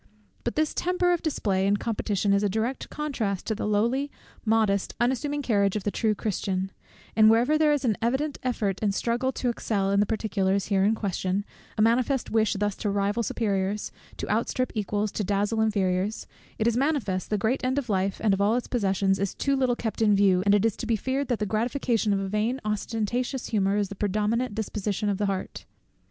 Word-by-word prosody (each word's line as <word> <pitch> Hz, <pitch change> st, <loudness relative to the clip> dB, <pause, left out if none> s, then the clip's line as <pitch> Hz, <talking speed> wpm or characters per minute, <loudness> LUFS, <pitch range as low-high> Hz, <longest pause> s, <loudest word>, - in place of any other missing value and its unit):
But 240 Hz, -, -2 dB
this 310 Hz, 0 st, +1 dB
temper 360 Hz, 0 st, +1 dB
of 345 Hz, -, -1 dB
display 195 Hz, -11 st, 0 dB
and 205 Hz, +1 st, +3 dB
competition 205 Hz, -3 st, 0 dB
is 200 Hz, -, +3 dB
a 205 Hz, -, +1 dB
direct 225 Hz, +6 st, -2 dB
contrast 235 Hz, -11 st, -3 dB
to 220 Hz, -, 0 dB
the 215 Hz, -, -3 dB
lowly, 235 Hz, +7 st, +1 dB, 0.3 s
modest, 215 Hz, -3 st, +1 dB
unassuming 285 Hz, +4 st, 0 dB
carriage 200 Hz, -5 st, +2 dB
of 210 Hz, -, -2 dB
the 205 Hz, -, -1 dB
true 215 Hz, 0 st, +1 dB
Christian: 195 Hz, -2 st, -2 dB, 0.4 s
and 215 Hz, -1 st, +7 dB
wherever 240 Hz, +7 st, +4 dB
there 310 Hz, -1 st, +4 dB
is 290 Hz, -2 st, +1 dB
an 220 Hz, -4 st, +2 dB
evident 265 Hz, +6 st, 0 dB
effort 215 Hz, -6 st, -1 dB
and 205 Hz, -2 st, +1 dB
struggle 245 Hz, +4 st, 0 dB
to 250 Hz, -, -1 dB
excel 200 Hz, -4 st, -1 dB
in 200 Hz, -, +3 dB
the 205 Hz, -, +3 dB
particulars 200 Hz, -3 st, 0 dB
here 195 Hz, -2 st, +3 dB
in 215 Hz, +3 st, +3 dB
question, 195 Hz, -1 st, -2 dB, 0.3 s
a 215 Hz, -, +4 dB
manifest 245 Hz, +3 st, +1 dB
wish 220 Hz, -1 st, +2 dB
thus 205 Hz, 0 st, -1 dB
to 210 Hz, -, -2 dB
rival 200 Hz, +3 st, 0 dB
superiors, 200 Hz, -2 st, -1 dB, 0.3 s
to -, -, -4 dB
outstrip 255 Hz, -1 st, 0 dB
equals, 210 Hz, -1 st, -1 dB
to 215 Hz, -, -2 dB
dazzle 205 Hz, +3 st, 0 dB
inferiors; 200 Hz, -1 st, 0 dB, 0.3 s
it 220 Hz, -, 0 dB
is 235 Hz, -1 st, +2 dB
manifest 245 Hz, -9 st, 0 dB
the 210 Hz, -, +1 dB
great 225 Hz, +7 st, 0 dB
end 255 Hz, +2 st, 0 dB
of 280 Hz, -3 st, -1 dB
life, 195 Hz, -2 st, 0 dB
and 210 Hz, -3 st, +4 dB
of 195 Hz, -, 0 dB
all 210 Hz, +3 st, +3 dB
its 245 Hz, -, -2 dB
possessions, 195 Hz, -4 st, +1 dB
is 200 Hz, -1 st, -2 dB
too 275 Hz, 0 st, +1 dB
little 255 Hz, -2 st, +2 dB
kept 225 Hz, -1 st, -4 dB
in 210 Hz, -2 st, +5 dB
view, 195 Hz, -2 st, +4 dB
and 200 Hz, -, +6 dB
it 205 Hz, +1 st, +2 dB
is 225 Hz, -, +1 dB
to 235 Hz, -, -5 dB
be 230 Hz, -, +2 dB
feared 260 Hz, +5 st, -1 dB
that 245 Hz, -, 0 dB
the 210 Hz, -, -1 dB
gratification 225 Hz, +1 st, 0 dB
of 200 Hz, -, +2 dB
a 195 Hz, -, -2 dB
vain 215 Hz, +6 st, 0 dB
ostentatious 225 Hz, +4 st, -2 dB
humour 200 Hz, -2 st, +1 dB
is 205 Hz, -2 st, 0 dB
the -, -, -6 dB
predominant 210 Hz, +4 st, 0 dB
disposition 210 Hz, -1 st, -2 dB
of 200 Hz, -1 st, -1 dB
the 205 Hz, -, +1 dB
heart. 195 Hz, -1 st, -4 dB
215 Hz, 210 wpm, -26 LUFS, 200-240 Hz, 0.4 s, and